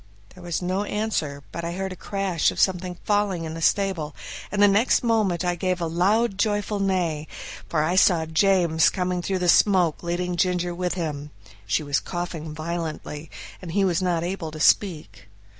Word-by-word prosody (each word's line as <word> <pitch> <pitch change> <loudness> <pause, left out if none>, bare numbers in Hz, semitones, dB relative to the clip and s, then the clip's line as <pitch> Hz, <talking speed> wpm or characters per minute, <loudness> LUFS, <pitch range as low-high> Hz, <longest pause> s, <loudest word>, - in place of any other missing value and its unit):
There 185 - -14
was 175 0 -3
no 185 +3 0
answer, 205 -10 -2
but 170 - -5
I 170 0 -3
heard 190 +1 -3
a - - -9
crash 195 -3 0
of - - -5
something 180 -1 +1
falling 205 -4 0
in 160 -1 -5
the 165 - -6
stable, 175 -5 0 0.4
and 205 - -2
the 205 - +7
next 205 +7 +3
moment 210 -7 +1
I 175 - +1
gave 185 +1 -1
a 170 - -1
loud, 195 +6 +1
joyful 205 -1 0
neigh, 175 -6 0 0.4
for 155 -2 +1
I 170 +4 0
saw 175 -4 +4
James 165 -1 +3
coming 180 -1 -2
through 190 +2 -1
the 180 -1 -1
smoke 180 -3 +4
leading 175 +1 -2
Ginger 180 -1 0
with 180 0 -2
him; 150 -4 -4 0.4
she 150 - +1
was 145 -1 0
coughing 175 -3 -5
violently, 160 -1 -5 0.3
and 170 -3 -7
he 200 0 +3
was 180 -1 +1
not 175 -3 0
able 175 -2 -3
to 155 0 -9
speak. 160 - +1
180 Hz, 185 wpm, -24 LUFS, 165-195 Hz, 0.4 s, the